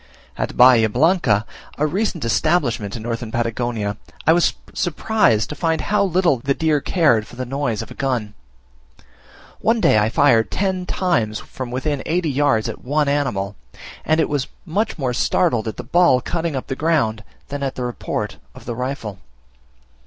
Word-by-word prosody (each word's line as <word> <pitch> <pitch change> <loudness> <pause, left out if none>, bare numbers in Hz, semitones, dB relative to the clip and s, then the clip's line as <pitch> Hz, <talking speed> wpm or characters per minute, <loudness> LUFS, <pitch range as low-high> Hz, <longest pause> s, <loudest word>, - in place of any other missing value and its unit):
At - - -4
Bahia 120 -3 +7
Blanca, 125 - +2 0.3
a 150 - +1
recent 175 - -1
establishment 120 - +1
in 115 - -6
Northern 115 -1 -4
Patagonia, 115 -3 -2 0.3
I 160 - +6
was 175 0 +3 0.2
surprised 175 - +1
to 150 - -5
find 160 +1 0
how 210 +3 +1
little 180 -6 +2
the 140 +3 0
deer 155 -3 +1
cared 135 - +2
for - - -13
the 130 +1 -4
noise 125 -4 -2
of - - -13
a - - -6
gun: 120 -6 -2 1.3
one 225 +1 +2
day 110 - +4
I 105 +1 +2
fired 120 -2 +3
ten 190 -2 -1
times 120 - 0
from 130 -2 -7
within 135 +3 -2
eighty 165 -2 0
yards 135 -5 +2
at - - -7
one 145 +3 +1
animal; 120 -9 -1 0.5
and 155 +1 +2
it - - +3
was 145 -3 -1 0.2
much 200 +6 -1
more 130 -5 -1
startled 120 -3 +1
at 110 - -4
the - - -5
ball 170 0 +4
cutting 165 +3 -3
up 130 - -3
the 135 - -4
ground 130 -9 0 0.3
than 145 0 -4
at 135 -1 -2
the 125 - -4
report 120 -4 -4 0.2
of - - -13
the 120 - -3
rifle. 125 -5 -4
135 Hz, 175 wpm, -20 LUFS, 115-160 Hz, 1.3 s, Bahia